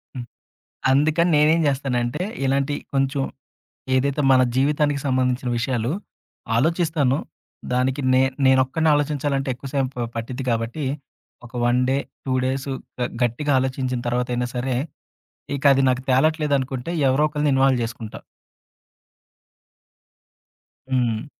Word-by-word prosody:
హ్మ్. 125 -2 -5 0.7
అందుకని 155 +5 +3
నేనేం‌జేస్తానంటే 145 -3 +1 0.2
ఇలాంటి 140 +2 +1 0.2
కొంచెం 135 0 +1 0.7
ఏదైతే 140 +3 +1
మన 130 -1 +6
జీవితానికి 145 +1 +2
సంబంధించిన 130 -1 0
విషయాలు, 120 0 -1 0.7
ఆలోచిస్తాను. 155 -1 +1 0.6
దానికి 130 +2 +1
నే 130 - +5 0.2
నేనొక్కడినే 130 +4 +3
ఆలోచించాలంటే 145 -2 -1
ఎక్కువ 130 +3 -9
సేపు 130 -3 -1
పట్టిద్ది 125 +3 -4
గాబట్టి, 115 +6 -2 0.6
ఒక 120 - -14
వన్ 120 +1 +3
డే, 135 - +2 0.3
2 130 - -1
డేసు, 135 +1 -2 0.3
గ - - -2 0.2
గట్టిగా 120 +5 0
ఆలోచించిన 130 -1 -2
తర్వాతయినా 125 0 -1
సరే, 125 +1 -1 0.8
ఇకది 140 -1 +4
నాకు 130 0 0
తేలట్లేదనుకుంటే, 140 0 +1 0.2
ఎవరో 135 +4 +3
ఒకళ్ళని 150 -1 0
ఇన్వాల్వ్ 135 -2 +3
జేసుకుంటా. 115 -1 -7 2.7
హ్మ్. 120 -2 0
135 Hz, 105 wpm, -22 LUFS, 125-145 Hz, 2.7 s, మన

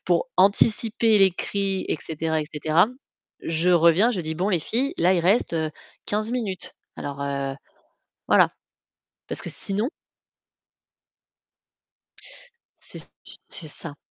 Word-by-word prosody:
pour - - +1
anticiper 220 +2 +3
les 195 -1 +6
cris 195 +1 -2
et - - 0
cetera 160 0 -2
et - - -3
cetera. 160 +5 +3 0.5
Je 165 +2 0
reviens, 170 +6 +5
je 195 -7 -2
dis: 160 0 -4
«Bon 185 +5 -1
les 185 - +2
filles, 260 - -1
là, 185 +2 +4
il 175 - +2
reste, 195 +5 +2
heu, 160 -1 -1 0.4
15 215 +2 -1
minutes. 210 -7 -4 0.2
Alors 140 0 -6
heu, 140 -1 -2 0.7
voilà», - - +5 0.8
parce - - -2
que - - -6
sinon 210 +6 -2 2.9
C'est - - -6 0.2
c'est 160 - +2
ça. 145 0 -5
180 Hz, 130 wpm, -24 LUFS, 160-210 Hz, 2.9 s, les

